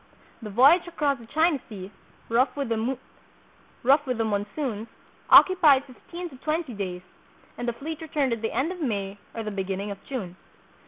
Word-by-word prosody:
The 215 - -6
voyage 275 - +5
across 295 -6 0
the 230 - -13
China 315 +2 +2
Sea, 195 -3 -8 0.4
rough 240 +4 +2
with 280 -4 -3
the 255 +2 -2
monsoons, 215 +2 -2 0.4
occupied 310 -8 +7
fifteen 340 +7 -9
or 265 - -12
twenty 310 -1 -2
days, 185 -3 -5 0.5
and 245 - -5
the 240 - 0
fleet 310 +7 -6
returned 290 -5 0
at 230 - -4
the 225 - -1
end 270 +9 0
of 365 -2 -7
May 200 -7 -2 0.2
or 225 - -3
the 215 - -4
beginning 195 +1 -3
of 200 - -9
June. 195 -10 -5
250 Hz, 160 wpm, -26 LUFS, 210-295 Hz, 0.5 s, occupied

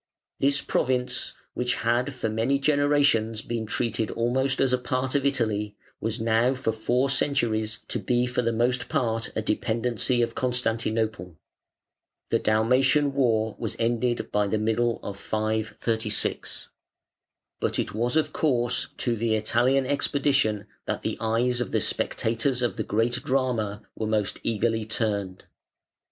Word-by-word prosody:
This 140 +1 +2
province, 125 -1 -1 0.2
which 125 0 0
had 120 +4 +1
for 125 - -2
many 115 +5 +1
generations 140 -6 +2
been 115 -2 -3
treated 115 -1 -1
almost 130 +3 0
as 130 -2 +2
a 125 - +3
part 130 +1 -2
of 140 -1 +2
Italy, 105 -6 -1 0.2
was 110 +2 -2
now 115 +3 +2
for 130 -3 -1
four 120 +4 +1
centuries 120 -6 0
to - - -1
be 125 -1 +1
for 125 0 -1
the 115 -1 +1
most 125 +2 0
part 115 -2 -1
a 110 - -1
dependency 120 +3 0
of 115 - -2
Constantinople. 115 -6 -1 1.0
The - - +3
Dalmatian 130 +6 +3
war 110 -5 +1
was - - -2
ended 120 +1 0
by 105 0 +2
the 110 - 0
middle 115 +2 +1
of 100 -1 -6
536. 110 +1 -2 0.9
But - - -1
it - - -2
was 120 +5 -1
of 160 - +1
course 120 -6 +1
to 120 -2 0
the 115 0 +1
Italian 120 +5 +2
expedition 135 -6 +1 0.2
that - - -2
the - - -1
eyes 120 +2 +1
of 125 - -2
the - - +2
spectators 120 +3 0
of 120 - 0
the - - -2
great 120 +4 0
drama 125 -7 0
were 110 - -2
most 105 -2 0
eagerly 115 0 0
turned. 105 -4 -2
115 Hz, 145 wpm, -26 LUFS, 110-130 Hz, 1.0 s, a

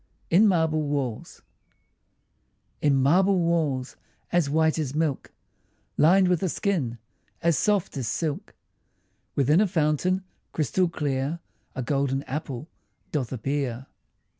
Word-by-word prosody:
IN 200 +6 +6
MARBLE 160 -4 +2
WALLS 140 -6 -3 1.4
In 145 -2 +3
marble 180 +9 +4
walls 160 -7 0 0.3
as 170 -5 +2
white 160 +1 +2
as 145 -2 -3
milk, 155 -4 -1 0.6
Lined 185 +4 +5
with 180 -2 +1
a 190 - 0
skin 155 - -1 0.5
as 170 -1 +3
soft 200 -2 +1
as 125 -4 -2
silk, 155 +4 -3 0.8
Within 145 +6 +4
a 215 - +3
fountain 175 +2 +1 0.3
crystal 165 +5 +1
clear, 145 -1 -2 0.4
A 130 - -3
golden 135 +1 0
apple 140 -1 -5 0.4
doth 135 -7 -2
appear. 130 0 -2
150 Hz, 115 wpm, -26 LUFS, 135-170 Hz, 1.4 s, IN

